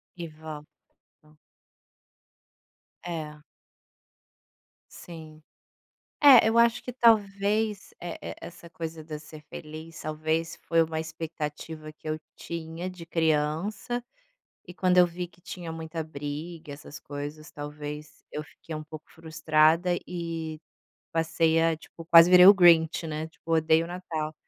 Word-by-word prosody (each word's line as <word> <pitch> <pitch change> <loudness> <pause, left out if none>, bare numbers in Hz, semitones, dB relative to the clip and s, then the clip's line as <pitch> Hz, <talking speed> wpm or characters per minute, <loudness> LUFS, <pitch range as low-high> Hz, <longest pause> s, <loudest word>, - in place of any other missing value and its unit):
E 170 -2 -6
vó, 155 0 -8 0.7
hã. 155 0 -23 1.7
É. 155 -3 -6 1.5
Sim. 160 -2 -11 0.8
É, 270 -6 +9
eu 225 - +1
acho 235 -1 +4
que - - -5
talvez, 210 -2 +2
é 175 -1 -6
é - - -6
essa 170 -1 -11
coisa 160 -1 -6
da 155 -1 -6
ser 155 0 -12
feliz, 155 +2 -9
talvez, 160 +2 -2
foi 165 -1 +3
uma 160 0 -3
expectativa 160 -1 -6
que 155 - -10
eu 155 0 -1 0.2
tinha 165 +1 -6
de 180 -2 -9
criança, 165 +9 0 0.7
e 180 - -9
quando 180 0 +2
eu 180 - +8
vi 175 +1 -5
que 175 - -25
tinha 175 -1 -7
muita 160 0 -5
briga, 150 +1 -7
essas 145 0 -10
coisas, 145 +2 -7
talvez 150 +1 -8
eu 150 - -4
fiquei 160 +1 -11
um 155 - -5
pouco 155 0 -10
frustrada, 160 +2 +2
e 165 -3 -5 0.5
passei 165 0 +2
a 165 0 +3
tipo, 165 +1 -13
quase 165 +1 +8
virei 180 0 +9
o 200 - +11
Grinch, 165 -3 +5
né, 155 0 -4
tipo, 160 +1 -10
odeio 160 0 +3
o - - -9
Natal. 165 -3 -4
160 Hz, 135 wpm, -27 LUFS, 155-175 Hz, 1.7 s, o